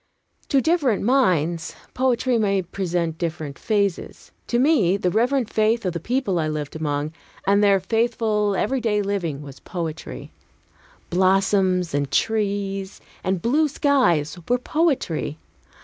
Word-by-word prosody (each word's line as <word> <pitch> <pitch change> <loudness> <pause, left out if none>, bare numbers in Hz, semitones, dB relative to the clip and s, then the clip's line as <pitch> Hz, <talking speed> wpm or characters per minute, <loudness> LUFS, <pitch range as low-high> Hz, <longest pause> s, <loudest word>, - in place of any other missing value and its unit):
To 275 - +3
different 290 - +1
minds, 175 - +1 0.2
poetry 255 -1 +1
may 200 -3 +1
present 170 -3 -2
different 160 -4 -4
phases. 200 -4 -2 0.2
To 240 - 0
me, 245 - +3
the 180 -3 0
reverent 245 +3 +1
faith 220 +1 +1
of 180 - 0
the 170 - -3
people 235 - -1
I 155 - 0
lived 150 -1 -4
among, 150 -1 -2 0.3
and 200 +2 +3
their 200 -1 +5
faithful 220 0 0
everyday 220 -2 0
living, 175 -8 -2
was 140 -2 -11
poetry; 165 -4 -6 0.8
blossoms 185 -1 +2
and 140 -1 0
trees 200 -1 -1 0.2
and 185 -2 -1
blue 300 +6 +3
skies 245 - +1
were 245 - +4
poetry. 255 - -1
195 Hz, 130 wpm, -23 LUFS, 170-235 Hz, 0.8 s, their